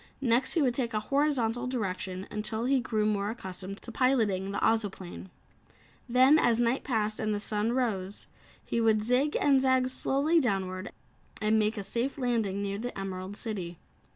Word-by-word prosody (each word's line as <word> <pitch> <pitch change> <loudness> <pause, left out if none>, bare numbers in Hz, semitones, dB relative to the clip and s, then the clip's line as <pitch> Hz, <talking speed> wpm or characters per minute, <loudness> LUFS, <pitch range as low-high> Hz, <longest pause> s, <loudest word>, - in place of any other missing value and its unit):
Next 250 -1 +1
he 330 - +2
would 250 -3 +2
take 235 -3 -2
a - - +2
horizontal 255 -4 +1
direction 190 -6 -3
until 220 +2 -2
he 270 +1 +3
grew 220 -3 -1
more 205 -1 0
accustomed 190 -3 -7
to 235 - -6
piloting 220 -7 +1
the 200 - -3
Ozoplane. 195 -5 -1 0.8
Then, 260 +5 +6
as 235 -4 +3
night 240 +2 +1
passed 215 -4 -1
and 215 -1 0
the - - -2
sun 210 +2 -1
rose, 205 -6 -2 0.4
he 235 - -1
would 220 -2 +3
zig 255 +6 +2
and 275 -2 +4
zag 260 -1 +3
slowly 280 +5 +2
downward 190 -6 -2 0.5
and 220 0 +2
make 215 +1 +1
a 205 - -3
safe 240 +8 -2
landing 225 -6 0
near 200 0 -3
the 245 -1 -5
Emerald 190 +1 -5
City. 185 -7 -4
225 Hz, 170 wpm, -29 LUFS, 200-255 Hz, 0.8 s, Then